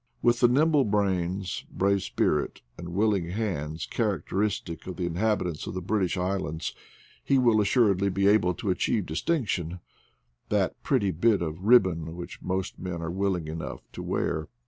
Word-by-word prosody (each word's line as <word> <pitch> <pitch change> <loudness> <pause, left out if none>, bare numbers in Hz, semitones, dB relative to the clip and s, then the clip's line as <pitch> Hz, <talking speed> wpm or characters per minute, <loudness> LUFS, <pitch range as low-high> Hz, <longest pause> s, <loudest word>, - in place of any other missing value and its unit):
With 120 0 +4
the 120 - +6
nimble 145 +3 +4
brains, 95 -3 -1
brave 100 0 +1
spirit, 75 -4 0
and 85 0 -8
willing 100 -2 +1
hands 85 -7 -3
characteristic 95 -5 -2
of 95 - -5
the 90 - -2
inhabitants 90 -2 -1
of - - -5
the 95 - -2
British 95 -1 0
Islands, 90 -4 -2 0.5
he 135 - +3
will 120 -4 +4
assuredly 100 -3 +3
be 100 +1 0
able 95 -4 +4
to 100 +1 -1
achieve 95 +2 0
distinction 90 - -1 0.3
— - - -45
that - - 0
pretty 100 -2 +1
bit 100 +3 +2
of 85 +3 -5
rib 120 0 +8
bon 80 -3 -4
which 90 0 -8
most 95 0 -3
men 90 -2 -4
are 85 0 -3
willing 95 -3 -1
enough 80 -6 -5
to - - -7
wear. 80 - -1
95 Hz, 165 wpm, -27 LUFS, 85-105 Hz, 0.5 s, rib